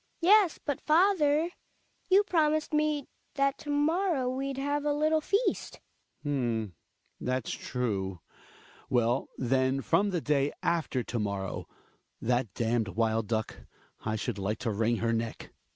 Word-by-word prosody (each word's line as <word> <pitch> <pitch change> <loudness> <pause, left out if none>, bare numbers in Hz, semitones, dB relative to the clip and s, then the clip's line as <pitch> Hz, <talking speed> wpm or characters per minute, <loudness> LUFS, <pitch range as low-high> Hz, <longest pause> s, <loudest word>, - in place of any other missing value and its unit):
Hed^hg. - - -43
Yes, 385 -1 +5
but 285 -3 -2
father, 325 -2 +3 0.6
you 390 +2 +6
promised 310 -5 +1
me 300 -2 +1 0.3
that 275 -1 +1
to 295 - -9
morrow 300 -1 +1
we'd 265 +1 -2
have 285 +1 -1
a 295 0 +1
little 310 +1 +2
feast. 405 +9 0 0.5
Hjalmar. 120 -7 0
H'm^ - - -20 0.5
that's 125 -1 -2
true. 100 -7 -2 0.7
TVell. 120 0 +2
then 130 +1 +1
from 195 - +2
tV|e 175 -3 -1
dav 145 -1 +1
after 160 -7 0
to 120 - -3
morrow. 100 -2 -3 0.5
T - - -9
h 120 - +1
at 120 -4 0
damned 115 -1 +1
w^ld 110 +1 0
duck, 110 -1 -2 0.5
I 110 0 -1
should, 110 -1 -3
like 100 +3 -1
to 115 - +1
wring 115 +3 +1
her 115 +1 0
neck. 115 0 -4
140 Hz, 150 wpm, -29 LUFS, -, 0.7 s, you